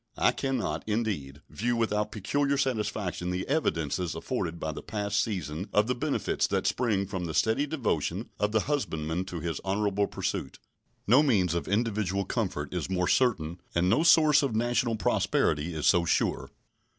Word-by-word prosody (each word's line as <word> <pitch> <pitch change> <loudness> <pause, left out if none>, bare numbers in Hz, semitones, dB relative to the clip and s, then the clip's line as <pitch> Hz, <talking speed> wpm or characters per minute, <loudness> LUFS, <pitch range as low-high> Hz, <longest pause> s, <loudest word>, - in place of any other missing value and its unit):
I - - +4
cannot, 115 - -2
indeed, 95 -11 -2
view 120 +3 -1
without 105 -2 0
peculiar 140 +7 0
satisfaction 105 - -1
the 90 +1 -2
evidences 85 - -1
afforded 85 0 -3
by 80 - -2
the - - -7
past 105 0 -1
season 90 -3 -4
of 105 - +3
the 125 - 0
benefits 145 +4 -1
that - - -1
spring 110 -6 +1
from 95 -3 -4
the 80 - -4
steady 115 +7 +2
devotion 145 -4 -2
of 105 0 +1
the 110 0 +2
husbandman 90 - -2
to 90 -3 -6
his 80 -3 -3
honorable 100 +1 0
pursuit. - - -4 0.5
No 125 +7 +6
means 100 - +2
of 85 - -2
individual 100 -2 0
comfort 95 -9 -2
is 90 -1 -3
more 90 -1 0
certain 85 -9 +1
and 90 +2 +3
no 120 - +4
source 155 -3 +6
of 135 -6 -1
national 120 0 +1
prosperity 80 -6 +1
is 75 - -2
so 85 -3 +5
sure. 85 - 0
105 Hz, 165 wpm, -28 LUFS, 90-120 Hz, 0.5 s, No